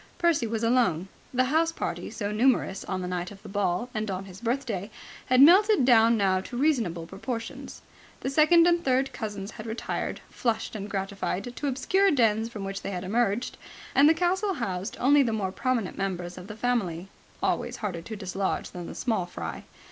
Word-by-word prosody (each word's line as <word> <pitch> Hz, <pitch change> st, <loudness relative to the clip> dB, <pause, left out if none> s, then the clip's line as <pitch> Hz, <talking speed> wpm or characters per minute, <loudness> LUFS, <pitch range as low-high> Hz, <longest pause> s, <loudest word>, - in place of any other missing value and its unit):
Percy 335 Hz, -9 st, +2 dB
was 225 Hz, 0 st, -2 dB
alone. 230 Hz, -7 st, +2 dB, 0.2 s
The 255 Hz, 0 st, +2 dB
house 320 Hz, +5 st, +2 dB
party, -, -, -4 dB
so 205 Hz, -1 st, -4 dB
numerous 215 Hz, -3 st, +2 dB
on 185 Hz, -1 st, -3 dB
the -, -, -3 dB
night 180 Hz, 0 st, -3 dB
of 205 Hz, 0 st, -13 dB
the -, -, -9 dB
ball 200 Hz, +2 st, 0 dB
and 215 Hz, -1 st, -2 dB
on 190 Hz, 0 st, -3 dB
his 190 Hz, +1 st, -12 dB
birthday, 235 Hz, -5 st, -2 dB, 0.4 s
had 255 Hz, +1 st, +6 dB
melted 385 Hz, -, +6 dB
down 230 Hz, -2 st, +6 dB
now 190 Hz, -2 st, +2 dB
to 240 Hz, -, -7 dB
reasonable 235 Hz, -, +1 dB
proportions. 225 Hz, +6 st, -6 dB, 0.4 s
The 265 Hz, -, -2 dB
second 325 Hz, +4 st, +6 dB
and 345 Hz, 0 st, +3 dB
third 265 Hz, +1 st, +1 dB
cousins 205 Hz, -3 st, -5 dB
had 230 Hz, -1 st, -9 dB
retired, 225 Hz, +1 st, -3 dB
flushed 230 Hz, -2 st, -2 dB
and 205 Hz, 0 st, -5 dB
gratified, 195 Hz, +3 st, -3 dB
to 290 Hz, -, -3 dB
obscure 380 Hz, +9 st, +2 dB
dens 225 Hz, -, +2 dB
from 215 Hz, -4 st, -7 dB
which 195 Hz, 0 st, -4 dB
they -, -, -4 dB
had 180 Hz, -2 st, -4 dB
emerged, 220 Hz, +3 st, 0 dB, 0.4 s
and 285 Hz, +2 st, +6 dB
the 325 Hz, -, +4 dB
castle 370 Hz, +3 st, +1 dB
housed 190 Hz, -5 st, -3 dB
only 285 Hz, +3 st, +5 dB
the 240 Hz, -4 st, +1 dB
more 195 Hz, -4 st, -1 dB
prominent 235 Hz, -3 st, -1 dB
members 180 Hz, -2 st, -3 dB
of 180 Hz, +1 st, -10 dB
the 210 Hz, -, -7 dB
family, 195 Hz, -8 st, -1 dB, 0.4 s
always -, -, 0 dB
harder 185 Hz, -6 st, -4 dB
to 220 Hz, +6 st, -7 dB
dislodge 195 Hz, -1 st, -3 dB
than 175 Hz, -1 st, -7 dB
the -, -, -8 dB
small 220 Hz, -8 st, -1 dB
fry. -, -, -6 dB
225 Hz, 190 wpm, -27 LUFS, 195-260 Hz, 0.4 s, had